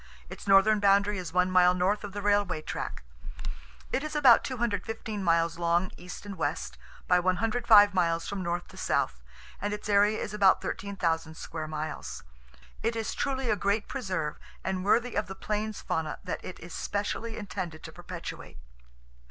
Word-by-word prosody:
Its - - -9
northern 200 +2 +6
boundary 200 0 +3
is 180 - -5
one 180 +1 +2
mile 180 0 +5
north 190 +3 +1
of 205 - -5
the 205 +1 -5
railway 205 -5 +2
track. 155 - -5 0.9
It 265 - +1
is 305 0 -5
about 265 -6 +7
215 225 -3 -3
miles 165 -1 +2
long 170 +2 +1
east 180 +3 -9
and 200 -2 -7
west - - -2 0.3
by 180 - +5
105 205 +2 +5
miles 170 -2 +1
from 200 -1 -3
north 175 0 -2
to - - -14
south, - - 0 0.4
and 205 +1 -1
its 210 - -8
area 205 +1 +4
is 205 - -4
about 200 -2 +5
13,000 165 -5 -2
square 155 -1 -5
miles. 155 0 -5 0.6
It 230 +1 0
is 225 -1 -2
truly 265 -4 -1
a - - +3
great 200 +2 0
preserve, 185 - -3 0.2
and 190 -1 -2
worthy 235 +4 +2
of - - -1
the 195 - -7
plains 215 +1 -3
fauna 160 -1 -2
that - - -4
it 185 - -8
is 170 - -10
specially 220 +2 -3
intended 185 -6 -5
to - - -8
perpetuate. - - -8
195 Hz, 170 wpm, -29 LUFS, 175-210 Hz, 0.9 s, about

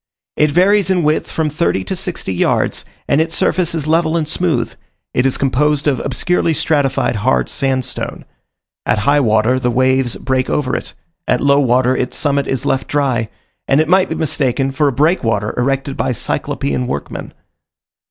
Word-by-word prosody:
It 150 - +3
varies 190 +5 +3
in 180 -3 +2
width 150 +1 0
from 155 -2 -1
thirty 150 - 0
to 190 - -4
sixty 180 - -3
yards, 90 - 0 0.2
and 140 - +3
its 165 0 -1
surface 175 -2 +1
is 155 -3 -2
level 160 +1 +2
and 155 -2 -1
smooth; 155 -6 -1 0.4
it 125 - +2
is 130 - 0
composed 145 +2 +1
of 135 -4 +1
obscurely 165 +4 0
stratified 140 -6 +1
hard 65 -11 +1
sandstone. 130 -2 -2 0.6
At 105 - +1
high 145 +1 +4
water 110 0 +2
the 125 - 0
waves 130 -2 +1
break 130 +5 -1
over 135 -3 0
it; - - -6 0.3
at - - +2
low 140 0 +3
water 130 -1 +2
its 125 -1 -2
summit 140 -2 0
is 130 -3 -2
left 135 - 0
dry, 130 -6 0 0.4
and 135 - +3
it 155 - +2
might 185 +2 +3
then 160 - -3
be - - -4
mistaken 135 -3 0
for 145 +2 +1
a - - +2
breakwater 120 - +1
erected 135 +2 -1
by 130 - -1
Cyclopean 70 - -2
workmen. - - -5
140 Hz, 175 wpm, -16 LUFS, 125-155 Hz, 0.6 s, high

